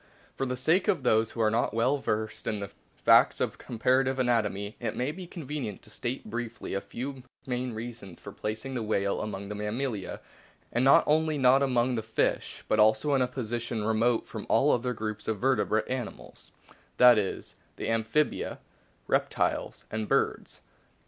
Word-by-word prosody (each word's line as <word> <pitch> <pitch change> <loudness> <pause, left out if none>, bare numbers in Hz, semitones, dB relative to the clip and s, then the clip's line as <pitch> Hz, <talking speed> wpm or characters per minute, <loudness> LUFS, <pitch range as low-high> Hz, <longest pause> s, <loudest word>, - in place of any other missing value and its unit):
For 135 - -2
the 125 0 -2
sake 160 +9 +2
of 135 - +1
those 110 -2 +2
who 115 - -2
are 110 -1 +3
not 115 -1 0
well 130 +5 +2
versed 110 -3 -2
in 105 - 0
the 100 -1 -6 0.3
facts - - +6
of - - -2
com 120 - -8
parative 130 +3 +2
anatomy 110 -5 0
it - - -3
may 125 +4 -1
be 180 +2 -9
convenient 150 - -5
to 105 - -13
state 120 +3 -4
briefly 120 0 -5
a 100 - -1
few 130 +4 -6 0.2
main 125 -1 -2
reasons 110 -6 -7
for - - -9
placing 110 +5 -4
the 125 - -2
whale 100 -2 0
among 100 -2 -5
the 105 - -5
Mammalia, 105 +1 -3 0.5
and 120 - +1
not 135 - +7
only 155 0 +2
not 130 0 +5
among 125 -2 +2
the 115 - -1
fish, 110 0 -1
but 110 - +2
also 110 +7 +4
in 135 - +3
a 125 - +3
position 120 -3 -3
remote 110 +2 +1
from - - -7
all - - +4
other 125 +1 0
groups 110 -2 -5
of 110 - 0
verte 125 -3 +1
brated 110 0 +1
animals 130 -3 -6 0.5
that 125 -3 +8
is, 100 - -4 0.2
the - - -5
Amphibia, 115 +6 0 0.5
Reptiles, - - 0
and 110 -1 -2
Birds. - - 0
120 Hz, 180 wpm, -28 LUFS, 110-130 Hz, 0.5 s, that